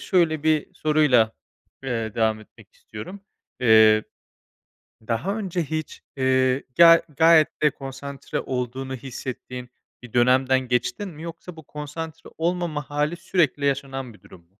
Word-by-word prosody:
şöyle 160 -5 +1
bir 155 -1 +1
soruyla, 150 -8 +3 0.5
eee, 115 -4 -3
devam 110 -2 +1
etmek 110 - -19
istiyorum. 110 - -10 0.4
Eee, 110 -2 +6 1.1
daha 145 - -1
önce 185 -5 -2
hiç, 155 +1 -5 0.2
eee, 130 0 +2
ya, 165 -1 +8 0.2
gayet 160 -1 +5
de 150 - +5
konsantre 135 +1 -6
olduğunu 130 +1 -4
hissettiğin 125 -1 -7 0.3
bir 120 - -12
dönemden 130 +2 +4
geçtin 125 - -1
mi, 160 0 -11
yoksa 170 +1 -9
bu 160 - -12
konsantre 150 +2 -8
olmama 170 -3 -2
hâli 150 +3 -1
sürekli 170 -5 0
yaşanan 135 -3 -2
bir 105 - -20
durum? 85 -2 -16
140 Hz, 125 wpm, -24 LUFS, 125-160 Hz, 1.1 s, ya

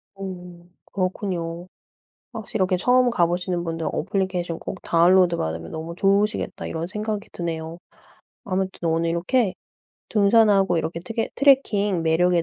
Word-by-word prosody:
오. 180 -3 -8 0.3
그렇군요. 180 -2 -3 0.7
확실히 220 0 -5
이렇게 185 -1 +2
'처음 250 +6 +3
가 175 -7 +3
보시는 175 0 -2
분들 165 -1 -3
애플리케이션 180 -1 -2
꼭 185 - -7
다운로드 175 +1 +4
받으면 80 - -4
너무 160 +1 -6
좋으시겠다.' 200 +3 +1
이런 165 +1 -3
생각이 210 +2 -4
드네요. 165 -1 -5 0.7
아무튼 185 -2 -2
오늘 165 +1 +1
이렇게 185 +5 +1 0.5
등산하고 200 -4 +4
이렇게 160 +1 -3
트개 225 +6 -3
트래킹 210 - +3
매력에 170 +2 +3
180 Hz, 345 characters per minute, -23 LUFS, 170-200 Hz, 0.7 s, 다운로드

